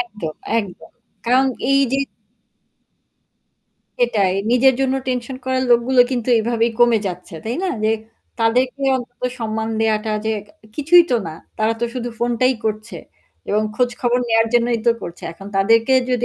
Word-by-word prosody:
একদম, 210 -10 -5 0.3
একদম। 195 -4 -11 0.3
কারণ 255 +3 +3 0.2
এই 275 0 +4
যে 270 - +2 2.0
সেটাই। 205 - +2 0.2
নিজের 255 +2 +5
জন্য 265 -1 +1
টেনশন 250 +1 -3
করার 260 0 0
লোকগুলো 240 +2 +4
কিন্তু 250 -2 -2
এইভাবেই 230 +1 +1
কমে 240 -2 +5
যাচ্ছে, 180 0 -6
তাই 230 +2 -2
না? - - 0 0.2
যে - - +3 0.5
তাদেরকে 250 +4 +1
অন্তত 245 -1 -9 0.2
সম্মান 220 -1 -3
দেওয়াটা 220 0 +1 0.2
যে - - +1 0.2
ক - - -25 0.3
কিছুই 325 +4 +6
তো 245 - +3
না। 160 - -5 0.3
তারা 220 +1 +2
তো - - +1
শুধু 245 -1 -3
ফোনটাই 245 +2 +1
করছে 215 +1 -3 0.5
এবং 210 +1 +1
খোঁজখবর 245 0 0
নেওয়ার 225 0 +3
জন্যই 240 0 +2
তো - - +7
করছে। 170 - -8
এখন 195 +4 -12
তাদেরকে 225 +5 +3 0.2
যদি 245 -1 +1
235 Hz, 150 wpm, -20 LUFS, 220-255 Hz, 2.0 s, তো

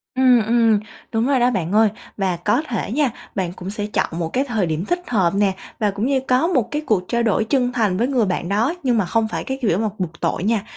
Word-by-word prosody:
Ừm, 255 -3 +5
ừm, 225 -2 +3 0.3
đúng 225 +1 +1
rồi 275 -2 +2
đó, 245 +1 +4
bạn 180 -6 -2
ơi. 220 +1 +5 0.3
Và 190 -3 0
có 210 - +1
thể 225 -3 -3
nha, 280 0 +2 0.2
bạn 180 -3 -2
cũng 185 +1 -7
sẽ 205 0 -3
chọn 210 - 0
một 165 - -1
cái 265 - +1
thời 225 -8 -1
điểm 160 +2 -2
thích 350 - -1
hợp 190 -7 +1
nè, 200 -1 +2 0.3
và 210 -2 +1
cũng 200 +4 -2
như 270 -1 +2
có 255 +3 +2
một 280 - +1
cái 300 +1 -2
cuộc 205 -5 +2
trao 235 0 +1
đổi 220 -1 +2
chân 250 +2 +1
thành 215 -7 +1
với 235 +6 +1
người 255 -5 +2
bạn 180 -2 -2
đó, 225 - +1
nhưng 245 -4 +2
mà 205 - +2
không 225 +3 +1
phải - - -4
cái 265 0 -4
kiểu 195 -6 +2
mà 220 0 0
bục 170 -3 -4
tội - - -1
nha. 215 -1 +1
220 Hz, 260 wpm, -21 LUFS, 195-250 Hz, 0.3 s, Ừm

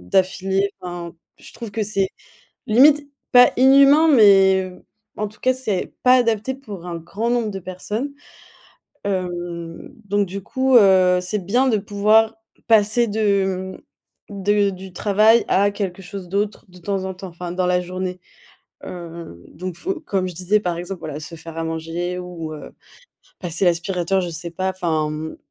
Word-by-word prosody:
d'affilée. 190 - 0
Enfin, 175 -1 -7 0.2
je - - -13
trouve 230 -3 -7
que 215 +1 -2
c'est 195 -2 +1 0.6
limite 285 +5 +5 0.2
pas 245 0 +8
inhumain, 275 +4 +6
mais, 195 -7 +6
heu, 180 - -15 0.3
en 210 - -2
tout 210 - -17
cas 255 - +3
c'est 220 -8 -3
pas 250 0 +6
adapté 235 +1 +1
pour 205 -10 -10
un 175 -1 -5
grand 200 +8 -4
nombre 235 -3 0
de 195 - -5
personnes. 210 +9 -5 0.9
Hem, 175 -3 -4 0.2
donc 200 0 0
du 195 +2 -6
coup, 260 +2 +1
heu, 185 -3 +5
c'est 190 +1 -3
bien 245 +8 +2
de 220 -4 +2
pouvoir 215 +2 +2 0.3
passer 225 +2 +4
de, 195 -3 -1 0.5
mmh, - - -10
de 205 0 +3
du 190 -1 -9
travail 215 +4 +4
à 200 +1 +3
quelque 195 -2 -4
chose 185 -1 -8
d'autre 205 +2 -2
de 180 - -16
temps 190 +2 -3
en 190 - -4
temps, 190 +1 -8
enfin 175 +1 -7
dans 180 0 -1
la 180 0 +2
journée. 185 0 -5 0.6
Heu, 170 - -9
donc 180 +1 -7
faut 370 -2 -3
comme 190 - -1
je 180 - -6
disais 190 +4 +1
par 175 -4 -2
exemple 180 +1 -6
voilà 150 -1 -6
se 155 +2 -9
faire 165 0 -9
à 165 - -2
manger 165 +2 -4
ou, 170 -3 -7
heu, 150 - -10 0.7
passer 175 +1 -1
l'aspirateur 175 +2 0
je 175 - -4
sais 165 +1 -5
pas. 185 +3 -2
Enfin, 160 -5 -1
mmh, 155 +1 -6
190 Hz, 170 wpm, -21 LUFS, 175-215 Hz, 0.9 s, pas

